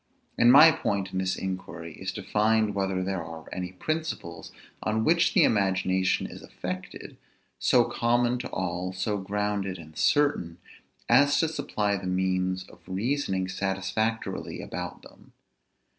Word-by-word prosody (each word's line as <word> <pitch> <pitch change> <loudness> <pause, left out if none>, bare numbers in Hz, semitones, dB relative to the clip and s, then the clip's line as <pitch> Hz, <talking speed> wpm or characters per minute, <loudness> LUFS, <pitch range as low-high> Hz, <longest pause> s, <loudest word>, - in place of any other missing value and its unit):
And 120 0 +6
my 150 +5 +9
point 100 -9 -2
in 95 - -2
this 95 0 0
inquiry 90 -3 -5
is, 95 +3 -5
to - - -6
find 110 0 +2
whether 95 -1 -1
there 95 -2 -2
are 80 -1 -9
any 90 -1 -4
principles, 155 - -4 0.3
on 110 +1 0
which 170 +4 +3
the - - +7
imagination 95 -2 +2
is - - -9
affected, 90 +1 -7 0.4
so - - +4
common 120 +1 +1
to 120 - -5
all, 90 0 -3
so 100 +3 -1
grounded 100 -1 -2
and 80 -2 -13
certain, 140 - +2 0.5
as 140 +4 +5
to 165 - +2
supply 110 -10 -1
the 95 -1 -6
means 95 0 0
of 95 - -18
reasoning 95 -1 -1
satisfactorily 95 +4 -2
about 90 +1 -6
them. - - -17
95 Hz, 145 wpm, -27 LUFS, 95-110 Hz, 0.5 s, my